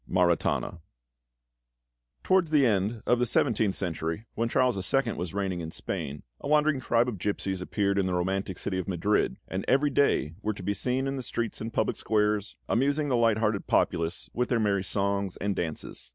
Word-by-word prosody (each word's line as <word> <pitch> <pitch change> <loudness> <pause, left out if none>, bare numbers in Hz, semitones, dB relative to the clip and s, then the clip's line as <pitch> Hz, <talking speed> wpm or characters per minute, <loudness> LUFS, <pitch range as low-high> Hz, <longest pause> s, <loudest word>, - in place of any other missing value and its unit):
MARITANA 90 -1 +1 1.4
Towards 185 -3 +3
the 150 -3 +4
end 105 0 +1
of 120 - +3
the 125 - +3
seventeenth 110 -5 +2
century, 80 +2 -3
when 115 +1 -1
Charles 125 0 +2 0.2
II. 135 -4 +2
was 90 +1 -5
reigning 95 -3 -1
in 80 -1 -5
Spain, 70 -2 -5 0.2
a - - -6
wandering 150 -1 +3
tribe 120 -1 +2
of 110 -7 -4
gipsies 95 -1 -2
appeared 100 +1 0
in 95 - +1
the 90 - 0
romantic 95 +1 -1
city 95 -1 -2
of 90 - -4
Madrid, 95 +3 +1
and 95 +1 -3
every 140 +3 +3
day 105 - +2
were 110 +1 -1
to 95 - -8
be 100 +3 0
seen 130 +5 0
in 135 0 -2
the - - -3
streets 120 -2 -3
and 115 +1 -4
public 110 - 0
squares, 105 -1 0
amusing 145 +4 +1
the 130 - +2
light 115 -2 +3
hearted 105 -2 0
populace 85 +2 0
with 125 +1 -1
their 120 - +2
merry 100 -3 +1
songs 100 -1 -1
and 100 0 -1
dances. 80 -4 -5
105 Hz, 190 wpm, -28 LUFS, 95-125 Hz, 1.4 s, the